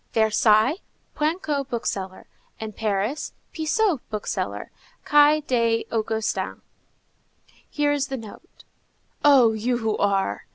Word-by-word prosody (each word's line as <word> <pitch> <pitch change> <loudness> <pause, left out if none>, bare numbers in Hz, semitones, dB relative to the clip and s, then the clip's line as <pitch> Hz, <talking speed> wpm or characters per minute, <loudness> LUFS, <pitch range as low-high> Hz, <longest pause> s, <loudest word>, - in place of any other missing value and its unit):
Versailles, 220 - +3 0.4
Poinçot, 300 -3 -1
book 235 -2 -3
seller; 190 -1 -4 0.3
and 220 -2 -6
Paris, 215 +7 -2 0.2
Pissot, 325 - +1
bookseller, 215 -2 -4 0.3
Quai 295 +1 +5
des 230 -5 +1
Augustins._ 220 -1 -2 1.1
Here 295 -1 +1
is 285 -1 0
the 265 - -4
note:— 220 -3 -13 0.6
"Oh, 260 -6 +6
you 240 +3 -1
who 220 -2 -1
are! 195 - 0
235 Hz, 110 wpm, -24 LUFS, 215-290 Hz, 1.1 s, Oh